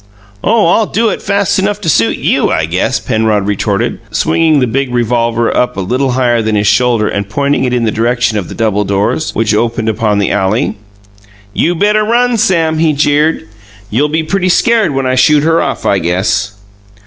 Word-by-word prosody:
"Oh, 220 +1 +2
I'll 210 +5 +2
do 225 +1 0
it - - -4
fast 200 0 0
enough 205 +1 -1
to 190 - -5
suit 115 -7 +2
YOU, - - 0
I - - 0
guess," - - -1
Penrod 110 -2 0
retorted, 100 0 -1
swinging 160 -3 +1
the 130 - +2
big 130 +2 -2
revolver 120 -1 0
up 125 - 0
a - - -2
little 125 +7 -1
higher 120 -2 +1
than 110 -1 -1
his 105 0 0
shoulder 120 -2 +2
and 100 0 -3
pointing 140 +4 0
it 125 - -1
in 125 -1 0
the 110 - 0
direction 115 -1 0
of 90 - -7
the - - -8
double 105 -2 0
doors, 100 +10 -1
which 110 -1 0
opened 115 0 -1
upon 105 -1 0
the 100 - 0
alley. 105 +3 0 0.8
"You 175 +2 0
better 210 +4 +2
run, 240 +2 +1
Sam," 165 -7 +1
he 160 -1 +2
jeered. 150 -2 0 0.4
"You'll 140 +8 +1
be 160 +1 -1
pretty 185 +3 -1
scared 230 +4 +2
when 135 -1 -1
I 130 - 0
shoot 145 +3 +3
her 165 +1 +2
off, - - -3
I 100 - +2
guess." 95 +5 -1
125 Hz, 195 wpm, -12 LUFS, 110-160 Hz, 0.8 s, shoot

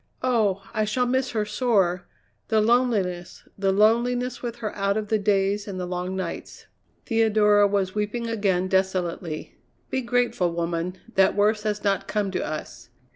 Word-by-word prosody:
Oh! 215 -6 +1
I 215 -1 +1
shall 230 +4 0
miss 260 +1 0
her 215 -2 -1
sore. 195 -7 +1 0.4
The 220 - +2
loneliness, 215 -7 0
the 195 -1 +1
loneliness 240 +4 +2
with 235 -2 -4
her 225 -3 -5
out 200 +1 0
of 210 -1 -3
the 220 - +2
days 200 0 +1
and 190 -2 -5
the 180 - -2
long 180 +1 -3
nights." 185 -3 -6 0.4
Theodora 215 -3 +4
was 195 -2 0
weeping 215 +3 -2
again 195 -5 0
desolately. 185 -4 -2 0.3
"Be 260 - 0
grateful, 235 -8 0
woman, 170 +2 -2 0.2
that 190 0 +4
worse 210 +1 +2
has 210 -1 -2
not 200 -2 0
come 205 -2 -1
to - - -2
us." 155 -5 -6
205 Hz, 160 wpm, -25 LUFS, 185-225 Hz, 0.4 s, Theodora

